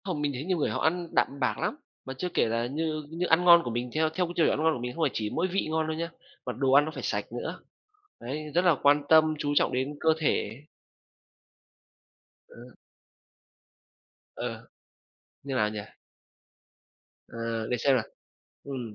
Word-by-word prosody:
Không, 175 -6 -2
mình 145 -1 0
nghĩ 135 0 -5
nhiều 185 +2 0
người 150 - 0
họ - - -2
ăn 175 +2 +1
đạm 140 - +1
bạc 125 -6 0
lắm, - - -1 0.3
mà 130 - -5
chưa 180 - -2
kể - - +3
là 115 +1 0
như 155 +3 -2
như 170 +3 -2
ăn 165 +2 +3
ngon 170 -1 +9
của 120 - -4
mình, 120 +2 -3
theo 155 0 +2
theo 180 +3 -1
cái 175 - -6
tiêu 165 - +3
chuẩn - - +1
ăn - - 0
ngon 160 0 +4
của 125 - -4
mình 125 +1 -4
không 165 - -1
phải 145 - +2
chỉ 105 -1 -2
mỗi 170 +11 0
vị 190 -2 -1
ngon 160 0 0
đâu 160 0 -3
nhá, 165 +1 -3 0.4
mà 125 - -3
đồ 130 +3 0
ăn 145 +1 +7
nó 155 - -4
phải - - -7
sạch - - -1
nữa, - - -5 0.6
đấy, 150 +5 -5
rất 175 +2 +3
là 170 -3 +5
quan 145 +1 +5
tâm 155 -1 +6
chú 145 -1 -1
trọng - - +3
đến 130 +3 -1
cơ 160 - +2
thể. 140 -5 -1 1.8
Ờ. - - -15 1.8
Ờ. - - -5 0.8
Như 140 -1 -4
nào 105 -5 +2
nhỉ? 105 0 -5 1.5
Ờ, 115 -1 -4
để 125 - 0
xem 135 +3 +3
nào, 120 - +1 0.6
ừm, 125 -6 -6
150 Hz, 205 wpm, -28 LUFS, 125-160 Hz, 1.8 s, ngon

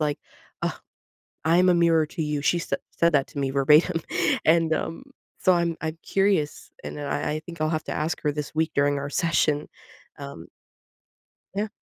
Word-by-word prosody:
like, 150 -1 0 0.4
"Oh, - - -1 0.7
I'm 175 +3 +4
a 180 - +6
mirror 165 -2 +4
to 160 +2 -4
you." 150 -2 -2
She 175 - +2
said 170 - -2
said 170 -1 +2
that 140 -2 +2
to - - -9
me 135 -1 0
verbatim. 150 +5 +4 0.4
And, 165 0 +4
um, 165 - -4 0.3
so 185 - +4
I'm 170 -1 +1
I'm 160 0 -3
curious 195 -6 0
and - - -6
I 145 +1 -2
I 155 - -3
think 170 -2 -9
I'll 155 - +1
have 155 -1 -1
to - - -4
ask 155 +2 -2
her 150 - +1
this 150 0 -5
week 160 +1 0
during 145 0 +2
our 140 +1 -4
session. 155 -3 +1 0.5
Um 70 0 -9 1.1
Yeah. 210 +2 0
155 Hz, 185 wpm, -25 LUFS, 150-170 Hz, 1.1 s, a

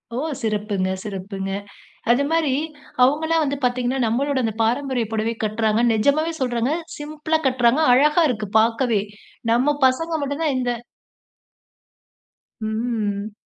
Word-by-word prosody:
ஓ! - - -2 0.2
சிறப்புங்க, 210 -4 -1
சிறப்புங்க. 195 -1 -5 0.6
அதுமாரி 280 +3 +2 0.5
அவுங்கல்லாம் 315 +5 +3
வந்து 285 0 -1
பார்த்தீங்கன்னா, 250 +1 0
நம்மளோட 270 +5 0
இந்த 220 -2 -1
பாரம்பரிய 245 0 0
புடவை 220 +1 -1
கட்றாங்க. 215 +1 +1
நிஜமாவே 285 +9 +2
சொல்றங்க. 245 0 0 0.3
சிம்பிளா 305 +2 -2
கட்றாங்க, 255 +3 +3
அழகா 300 +6 +4
இருக்கு 215 -4 -3
பார்க்கவே. 230 -1 +2 0.5
நம்ம 270 +5 +2
பசங்க 330 +6 0
மட்டும் 285 +3 -2
தான் 290 -4 +1
இந்த 250 -1 0 1.9
ம். 215 -2 -2
245 Hz, 110 wpm, -22 LUFS, 220-285 Hz, 1.9 s, அழகா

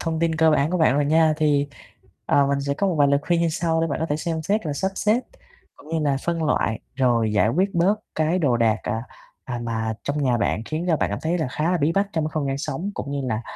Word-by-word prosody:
thông 165 -1 -2
tin 165 -1 +1
cơ 160 0 +4
bản 150 +1 +2
của 180 - 0
bạn 155 -5 +4
rồi 145 +1 +2
nha. 160 +1 +3
Thì, 145 -2 +2 0.6
ờ, 140 -1 +3
mình 140 0 0
sẽ 140 0 -1
có 200 +6 0
một 180 - 0
vài 145 -2 +4
lời 140 0 +3
khuyên 170 +1 +1
như 170 - +2
sau, 165 0 0
để 165 - +1
bạn 145 -2 -3
có 160 - 0
thể 150 - -1
xem 160 0 -3
xét 200 +3 0
là 150 - -1
sắp 190 +7 -1
xếp 215 +4 +2 0.6
cũng - - -16
như 165 0 -1
là 145 -2 +1
phân 170 -1 -1
loại. 115 -6 0
Rồi 120 -4 +2
giải 105 0 +3
quyết 185 - 0
bớt 175 +4 +3 0.2
cái 160 +3 +1
đồ 135 -8 +2
đạc, 115 -2 +2
à, 115 -1 -2 0.4
à, 120 -2 -4
mà 110 -1 -2
trong 145 +1 -2
nhà 125 -3 +2
bạn 110 -1 0
khiến 155 +6 -3
cho 165 - +3
bạn - - -1
cảm - - -2
thấy 170 +3 0
là 155 - -1
khá 155 +6 -1
là 180 - +1
bí 150 +3 +2
bách 200 +2 +1
trong 160 -2 0
cái 155 - -3
không 155 -3 -1
gian 135 0 -2
sống, 185 +6 -3
cũng 140 - -5
như 140 - -2
là, 110 0 -2
155 Hz, 285 wpm, -23 LUFS, 140-165 Hz, 0.6 s, cơ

